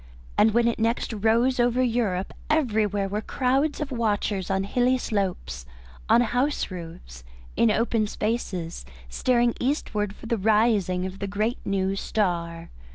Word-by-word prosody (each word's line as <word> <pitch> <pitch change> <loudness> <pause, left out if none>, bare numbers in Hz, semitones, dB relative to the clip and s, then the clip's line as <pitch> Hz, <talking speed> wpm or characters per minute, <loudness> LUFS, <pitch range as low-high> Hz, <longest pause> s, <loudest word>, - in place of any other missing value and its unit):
And 220 +1 +4
when 235 0 +3
next 230 +1 0
it - - -4
rose 235 +5 +2
over 245 +1 +3
Europe 225 -6 0 0.2
everywhere 215 -9 +1
were 205 +2 -2
crowds 270 +6 0
of 295 -2 -3
watchers 210 -5 -1
on 190 0 +1
hilly 245 +5 +2
slopes, 190 - -3 0.4
on 240 - +6
house 245 +2 0
roofs, 165 - -9 0.3
in 230 - +4
open 220 0 +1
spaces, 205 - -3 0.3
staring 240 - +2
eastward 210 -7 -1
for - - -13
the 230 0 0
rising 210 -3 +2
of 190 +1 -6
the 200 - -3
great 215 +5 -1
new 195 0 0
star. 170 -5 -2
215 Hz, 145 wpm, -25 LUFS, 195-240 Hz, 0.4 s, on